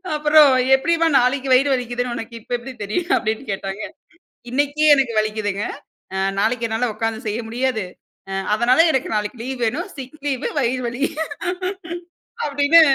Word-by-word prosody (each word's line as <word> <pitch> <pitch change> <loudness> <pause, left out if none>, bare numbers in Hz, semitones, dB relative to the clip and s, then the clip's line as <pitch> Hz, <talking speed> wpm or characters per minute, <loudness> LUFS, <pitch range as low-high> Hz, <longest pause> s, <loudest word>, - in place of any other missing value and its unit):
அப்புறம் 300 -1 +6 0.2
எப்டிம்மா, 330 +4 +2
"நாளைக்கு 260 +2 +1
வயிறு 270 +3 +5
வலிக்குதுன்னு 245 -1 -2
உனக்கு 225 0 -7
இப்ப 245 - -3
எப்டி 250 +2 -9
தெரியும்?" 345 - -2
அப்டின்னு 220 +4 -2
கேட்டாங்க. 195 +1 -4 0.7
"இன்னைக்கே 290 +3 +1
எனக்கு 265 -4 +1
வலிக்குதுங்க. 210 -2 -1 0.5
அ - - -1 0.2
நாளைக்கு 230 +2 +1
என்னால 230 +2 0
உக்காந்து 225 0 -2
செய்ய 215 +2 -2
முடியாது. 240 -4 -1 0.5
அ - - -3 0.2
அதனால, 245 +6 +3
எனக்கு 265 -2 -1
நாளைக்கு 210 +3 -2
லீவ் 260 -1 -5
வேணும். 295 - -2
சிக் 265 +3 -9
லீவு 265 -3 -1
வயிறு 255 0 0
வலி." 240 +4 -3 1.4
அப்டின்னு 290 +3 +5
250 Hz, 145 wpm, -21 LUFS, 225-280 Hz, 1.4 s, அப்புறம்